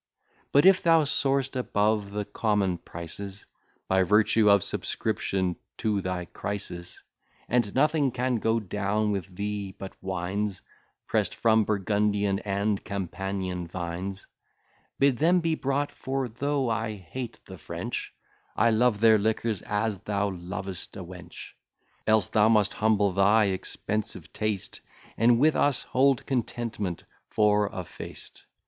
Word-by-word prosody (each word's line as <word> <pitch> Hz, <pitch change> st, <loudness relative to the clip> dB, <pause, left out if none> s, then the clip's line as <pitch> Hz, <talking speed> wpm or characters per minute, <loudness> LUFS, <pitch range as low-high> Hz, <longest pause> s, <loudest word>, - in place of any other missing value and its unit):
But 145 Hz, +4 st, +5 dB
if 190 Hz, 0 st, +7 dB
thou 165 Hz, -2 st, +5 dB
soar'st 135 Hz, -2 st, +1 dB
above 105 Hz, -4 st, +1 dB
the 105 Hz, 0 st, -3 dB
common 100 Hz, -6 st, 0 dB
prices, 95 Hz, +4 st, -7 dB, 0.4 s
By 95 Hz, 0 st, +3 dB
virtue 105 Hz, +3 st, +4 dB
of 100 Hz, -2 st, +5 dB
subscription 95 Hz, -2 st, -1 dB, 0.2 s
to 105 Hz, -3 st, 0 dB
thy 90 Hz, -1 st, -3 dB
Crisis, 90 Hz, -2 st, -5 dB, 0.5 s
And 120 Hz, -4 st, +1 dB
nothing 150 Hz, 0 st, +3 dB
can 125 Hz, 0 st, 0 dB
go 115 Hz, +1 st, +1 dB
down 105 Hz, +1 st, -1 dB
with 95 Hz, -2 st, -4 dB
thee 100 Hz, -1 st, -4 dB
but 95 Hz, -1 st, -7 dB
wines 95 Hz, +2 st, -3 dB, 0.4 s
Press'd -, -, 0 dB
from 110 Hz, -1 st, +3 dB
Burgundian 100 Hz, -1 st, +1 dB
and 100 Hz, 0 st, -1 dB
Campanian 95 Hz, -2 st, -3 dB
vines, 90 Hz, +3 st, -5 dB, 0.7 s
Bid 135 Hz, -3 st, +3 dB
them 175 Hz, +3 st, +4 dB
be 165 Hz, -1 st, 0 dB
brought; 140 Hz, -1 st, -1 dB
for, 135 Hz, 0 st, -3 dB
though 140 Hz, +3 st, -1 dB
I 110 Hz, -1 st, -1 dB
hate 110 Hz, +6 st, -7 dB
the -, -, -11 dB
French, -, -, -5 dB, 0.4 s
I 115 Hz, -, +4 dB
love 110 Hz, -1 st, +2 dB
their 110 Hz, -1 st, +6 dB
liquors, 110 Hz, -1 st, 0 dB
as 105 Hz, -1 st, -1 dB
thou 100 Hz, 0 st, -1 dB
lovest 95 Hz, +2 st, -5 dB
a 95 Hz, -, -6 dB
wench; 90 Hz, 0 st, -10 dB, 0.6 s
Else 110 Hz, -3 st, +4 dB
thou 110 Hz, 0 st, +3 dB
must 105 Hz, -2 st, +3 dB
humble 105 Hz, -2 st, +2 dB
thy 100 Hz, +3 st, +4 dB
expensive 95 Hz, -3 st, -4 dB
taste, 105 Hz, -3 st, -2 dB, 0.3 s
And, 115 Hz, +1 st, +4 dB
with 150 Hz, +5 st, +4 dB
us, 145 Hz, -3 st, +2 dB
hold 135 Hz, 0 st, +2 dB
contentment 115 Hz, -7 st, -3 dB, 0.3 s
for 105 Hz, -1 st, +3 dB
a 95 Hz, -2 st, -5 dB
feast. -, -, -10 dB
105 Hz, 135 wpm, -27 LUFS, 95-115 Hz, 0.7 s, if